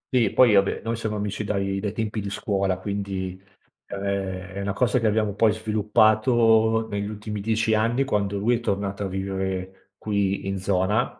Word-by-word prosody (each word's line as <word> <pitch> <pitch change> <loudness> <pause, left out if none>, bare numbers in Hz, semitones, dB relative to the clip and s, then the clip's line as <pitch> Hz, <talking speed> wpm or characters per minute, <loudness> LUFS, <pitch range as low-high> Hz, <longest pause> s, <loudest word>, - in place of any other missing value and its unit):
Sì, 115 -5 +4
poi 125 -4 +5
vabbè, 100 -1 +2
noi 115 +1 -1
siamo 110 -2 -3
amici 105 +1 -3
dai 100 -1 -1
dai 100 0 -2
tempi 110 0 -3
di 100 - -4
scuola, 100 -2 -1
quindi, 95 -1 -4 0.5
ehm, 100 - -6 0.5
è 100 - -4
una 100 0 -2
cosa 125 +4 +2
che 115 - +1
abbiamo 105 -1 +1
poi 110 +2 +3
sviluppato 110 +1 +3
negli 100 -1 -3
ultimi 105 0 -5
10 110 +1 +1
anni 115 +5 +2
quando 100 -6 -1
lui 115 +4 +2
è - - -7
tornato 100 -2 -2
a - - -1
vivere 95 0 -4
qui 100 -2 -1
in 95 0 -2
zona. 100 +5 0
105 Hz, 175 wpm, -24 LUFS, 100-110 Hz, 0.5 s, poi